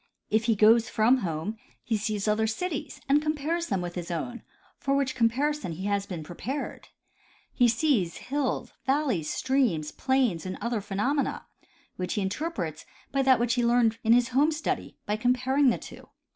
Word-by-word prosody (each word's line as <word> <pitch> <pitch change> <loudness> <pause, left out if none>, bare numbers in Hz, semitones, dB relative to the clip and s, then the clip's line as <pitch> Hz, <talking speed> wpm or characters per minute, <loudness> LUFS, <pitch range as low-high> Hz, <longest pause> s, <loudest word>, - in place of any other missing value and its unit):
If 220 +1 +2
he 230 -2 +3
goes 225 +3 +5
from 235 +4 +4
home 180 +1 -3 0.3
he 230 - 0
sees 210 0 -2
other 215 +1 +2
cities 295 +8 -3
and 285 +2 +4
compares 310 +3 -1
them 195 -3 -1
with 175 0 -4
his 175 -1 -5
own, 205 +9 -4 0.4
for 275 0 0
which 275 -1 0
com 230 -2 +4
parison 285 - -1
he 190 +4 -6
has 200 -1 0
been 175 -5 -5
prepared; 240 - -5 0.7
he 245 - +4
sees 235 - +1
hills, 275 0 -2
valleys, 265 - +1
streams, 245 - +1
plains 260 - +1
and 185 0 -5
other 235 0 -1
phenomena, 210 +9 -1 0.5
which 180 -1 -2
he 210 - 0
interprets 190 - -3 0.3
by 275 - +1
that 260 -2 +5
which 240 0 +1
he 245 -1 +1
learned 235 -1 +3
in 225 - +3
his 245 +1 +4
home 280 +5 +3
study, 310 0 -3
by 210 - -1
comparing 255 +4 +3
the 235 - +1
two. - - -12
235 Hz, 175 wpm, -27 LUFS, 200-270 Hz, 0.7 s, goes